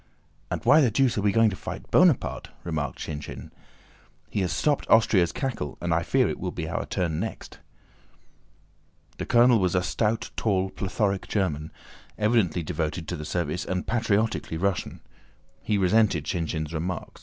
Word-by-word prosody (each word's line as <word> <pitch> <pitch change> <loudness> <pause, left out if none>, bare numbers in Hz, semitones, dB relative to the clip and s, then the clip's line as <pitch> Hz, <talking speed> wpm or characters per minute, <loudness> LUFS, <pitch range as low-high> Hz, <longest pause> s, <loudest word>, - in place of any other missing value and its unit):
"And - - -4
why 155 +2 +7
the 130 - +4
deuce 125 +2 +2
are - - 0
we 100 0 +2
going 115 +1 +4
to - - -4
fight - - -8
Bonaparte?" - - +3
remarked 80 -4 -3
Shinshín. 75 -1 -7 0.8
"He 100 - -1
has 90 - 0
stopped 150 -2 0
Austria's 100 -6 +4
cackle 120 - -4
and 85 -1 -1
I 80 - +2
fear - - +2
it - - -4
will - - -3
be - - -5
our - - -3
turn 80 -3 -1
next." 110 +4 -6 1.6
The - - -4
colonel 120 -1 +5
was 90 -1 +1
a 90 - +2
stout, 110 +4 -1
tall, 95 -3 0
plethoric 100 0 -1
German, 80 -7 -1 0.5
evidently 105 -6 +2
devoted 80 +1 -3
to 90 - -2
the 75 -2 -6
service 85 0 -2
and 90 -1 -3
patriotically 110 -6 0
Russian. 95 +1 -2 0.6
He 105 - 0
resented 100 -4 +3
Shinshín's 80 -2 -3
remark. 85 +3 -4
95 Hz, 160 wpm, -26 LUFS, 85-110 Hz, 1.6 s, why